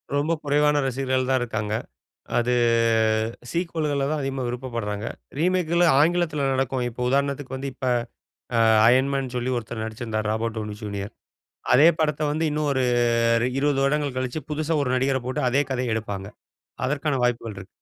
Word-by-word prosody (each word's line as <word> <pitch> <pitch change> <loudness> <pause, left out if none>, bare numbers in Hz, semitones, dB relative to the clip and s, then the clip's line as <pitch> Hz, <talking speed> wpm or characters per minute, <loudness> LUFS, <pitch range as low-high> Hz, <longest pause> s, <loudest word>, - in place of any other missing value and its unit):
ரொம்ப 145 +3 +1
குறைவான 150 0 +3
ரசிகர்கள் 130 0 -1
தான் 130 -1 +3
இருக்காங்க. 110 -3 -2 0.6
அது 120 +1 +1 1.0
சீக்வல்கள்ல 155 -5 -1
தான் 155 -1 -1
அதிகமா 135 -1 -3
விருப்பப்படுறாங்க. 115 -4 -4 0.3
ரீமேக்குகள் 175 0 +2 0.2
ஆங்கிலத்தில 155 -3 +2
நடக்கும். 130 -1 0
இப்ப 120 - -13
உதாரணத்துக்கு 140 0 -1
வந்து 135 +1 -4
இப்ப 130 - -5 0.7
அ - - +4 0.3
Iron 130 +2 +4
Man 135 -1 0
சொல்லி 125 +1 -1
ஒருத்தர் 110 -1 -5
நடிச்சிருந்தாரு. 110 -1 -4
Robert 115 +1 -2
Downey 105 -1 -4
junior. 100 -1 -5 0.6
அதே 140 +6 +7
படத்த 150 -1 0
வந்து 155 +2 0
இன்னும் 150 0 0
ஒரு 130 -1 +1 0.6
ரி 125 - +1
20 140 -1 +1
வருடங்கள் 140 -1 0
கழிச்சு, 130 +3 -2
புதுசா 155 +2 -1
ஒரு 130 - -2
நடிகர 130 +1 +1
போட்டு, 130 - -2
அதே 135 +3 +3
கதைய 125 -3 -1
எடுப்பாங்க. 100 -3 -4 0.6
அதற்கான 145 +1 0
வாய்ப்புகள் 115 -3 -1
இருக்கு. 95 -1 -9
130 Hz, 150 wpm, -24 LUFS, 120-150 Hz, 1.0 s, அதே